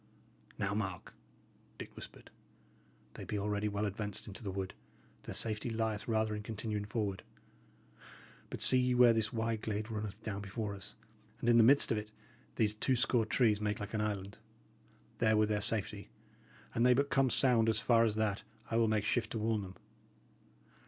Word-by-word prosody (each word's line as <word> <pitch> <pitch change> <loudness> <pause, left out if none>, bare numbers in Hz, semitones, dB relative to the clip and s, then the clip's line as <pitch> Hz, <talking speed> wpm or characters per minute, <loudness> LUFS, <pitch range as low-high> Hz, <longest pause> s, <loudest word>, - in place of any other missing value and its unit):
"Now, 100 0 -1
mark," 95 -4 -4 0.6
Dick - - -9
whispered. - - -11 0.8
"They - - -8
be 105 - -3
already 105 +1 -1
well 105 0 -1
advanced 105 0 -4
into 100 - -6
the 105 - -5
wood; 95 0 -4 0.5
their - - -6
safety 110 +1 -1
lieth 110 -2 -2
rather 110 -1 +1
in 105 - -4
continuing 105 -1 -4
forward. 105 -3 -3 1.3
But - - -6
see 130 - +6
ye 125 0 +2
where 125 -1 +7
this 110 -1 0
wide 115 -2 -2
glade 110 +1 -3
runneth 105 -1 -5
down 100 -2 -4
before 100 +1 -4
us, 100 -1 -9 0.4
and - - -3
in 120 -1 +6
the 115 - +7
midst 140 +5 +5
of 110 - +1
it, 105 0 -9 0.4
these 105 -2 +2
two 130 +5 +1
score 120 -2 +1
trees 110 -3 +2
make 105 0 -1
like 105 0 -6
an 110 - 0
island? 100 -2 -4 0.8
There 110 -2 +3
were 105 - +4
their 105 -1 -1
safety. 105 -1 +2 0.6
An 115 - -1
they 125 +1 +5
but 140 +2 0
come 135 -1 +3
sound 120 -3 +3
as 110 -1 +1
far 115 0 +4
as 110 -2 +1
that, 110 -2 0 0.3
I 115 - +1
will 115 -1 +3
make 110 -2 +1
shift 120 +2 0
to - - -2
warn 110 0 0
them. 95 -1 -9
110 Hz, 185 wpm, -33 LUFS, 105-115 Hz, 1.3 s, where